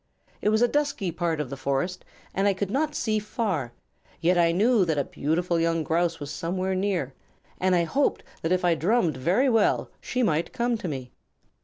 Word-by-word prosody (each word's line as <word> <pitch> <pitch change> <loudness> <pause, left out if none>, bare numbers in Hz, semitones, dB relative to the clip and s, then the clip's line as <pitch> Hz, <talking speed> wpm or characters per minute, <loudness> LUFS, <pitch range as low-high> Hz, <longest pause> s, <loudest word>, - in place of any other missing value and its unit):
It - - +2
was 220 +2 +3
a - - +5
dusky 285 -9 -1
part 165 -2 -1
of 145 -3 -3
the - - -3
forest 140 +7 -2 0.3
and 195 +1 +1
I 200 - +2
could 195 +1 -3
not 295 +3 0
see 215 -6 0
far, 200 - -2 0.5
yet 175 +2 +3
I 170 -1 +4
knew 215 +4 +3
that 160 -4 0
a 140 - +2
beautiful 170 +5 -1
young 165 -1 +1
Grouse 170 +1 0
was 145 0 -6
somewhere 185 +5 -2
near, 185 -8 -1 0.5
and 185 0 +3
I 170 - +3
hoped 275 - 0 0.2
that 165 - -1
if 185 0 +2
I 175 - +4
drummed 175 - +1
very 180 - +2
well 225 -4 +2
she 255 - -1
might 165 -6 0
come 240 0 0
to 185 - -4
me." 130 -5 -5
180 Hz, 200 wpm, -26 LUFS, 160-215 Hz, 0.5 s, a